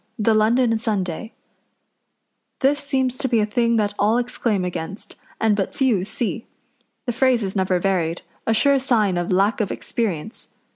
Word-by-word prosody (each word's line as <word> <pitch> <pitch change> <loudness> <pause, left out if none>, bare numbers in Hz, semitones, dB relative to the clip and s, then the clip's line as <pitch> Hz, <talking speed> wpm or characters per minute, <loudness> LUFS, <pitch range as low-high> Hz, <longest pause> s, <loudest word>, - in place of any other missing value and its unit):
] - - -46
THE 225 - +6
LONDON 225 +2 +3
SUNDAY 210 -2 -3 1.3
This 285 +2 +3
seems 265 -3 -1
to - - 0
be 235 -3 +2
a 210 - +2
thing 235 +2 +1
that 205 -2 +1
all 215 +3 +3
exclaim 235 -5 -1
against, 180 +3 -6 0.2
and 220 -2 +3
but 195 -2 -2
few 240 -9 +2
see. 220 +2 -3 0.6
The 245 - 0
phrase 250 -1 +2
is 195 0 -3
never 185 -1 +1
varied 175 -3 -1 0.2
a 225 - +3
sure 280 +4 +4
sign 225 -8 +1
of 175 +1 -2
lack 200 +5 +2
of 205 - -1
experience. 215 -2 -4
220 Hz, 165 wpm, -22 LUFS, 195-245 Hz, 1.3 s, THE